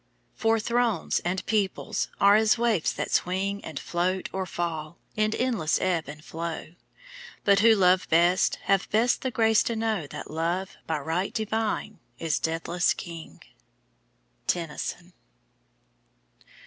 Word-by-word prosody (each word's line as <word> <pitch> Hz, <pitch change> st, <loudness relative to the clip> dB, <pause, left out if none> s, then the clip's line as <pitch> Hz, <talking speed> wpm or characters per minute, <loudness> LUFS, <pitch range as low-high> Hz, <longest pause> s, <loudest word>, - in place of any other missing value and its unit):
For 225 Hz, 0 st, +2 dB
thrones 235 Hz, -4 st, +1 dB
and 185 Hz, +2 st, -2 dB
peoples 205 Hz, -4 st, -1 dB
are 200 Hz, +1 st, +6 dB
as 220 Hz, +1 st, +4 dB
waifs 230 Hz, -8 st, +2 dB
that -, -, -4 dB
swing 195 Hz, +3 st, 0 dB
And 155 Hz, -3 st, -6 dB
float 185 Hz, +2 st, -1 dB
or 190 Hz, -1 st, -2 dB
fall, 165 Hz, -2 st, -4 dB, 0.2 s
in 215 Hz, 0 st, +1 dB
endless 230 Hz, -12 st, +1 dB
ebb 175 Hz, -4 st, 0 dB
and 150 Hz, +2 st, -10 dB
flow; 165 Hz, 0 st, -5 dB, 0.7 s
But 200 Hz, 0 st, +5 dB
who 225 Hz, +1 st, +6 dB
love 185 Hz, -2 st, +3 dB
best 175 Hz, +3 st, +4 dB
have 195 Hz, -1 st, +1 dB
best 230 Hz, +3 st, +2 dB
the 260 Hz, -, -1 dB
grace 225 Hz, -2 st, +3 dB
to 230 Hz, -, -1 dB
know 220 Hz, -8 st, -1 dB
That -, -, -8 dB
Love, 170 Hz, +4 st, -2 dB
by 160 Hz, -, 0 dB
right 165 Hz, +6 st, -2 dB
divine, 220 Hz, -1 st, -2 dB, 0.2 s
is 160 Hz, -4 st, -1 dB
deathless 165 Hz, +2 st, 0 dB
King. 165 Hz, -2 st, -9 dB, 1.0 s
TENNYSON. 175 Hz, +1 st, -3 dB
185 Hz, 135 wpm, -27 LUFS, 165-220 Hz, 1.0 s, are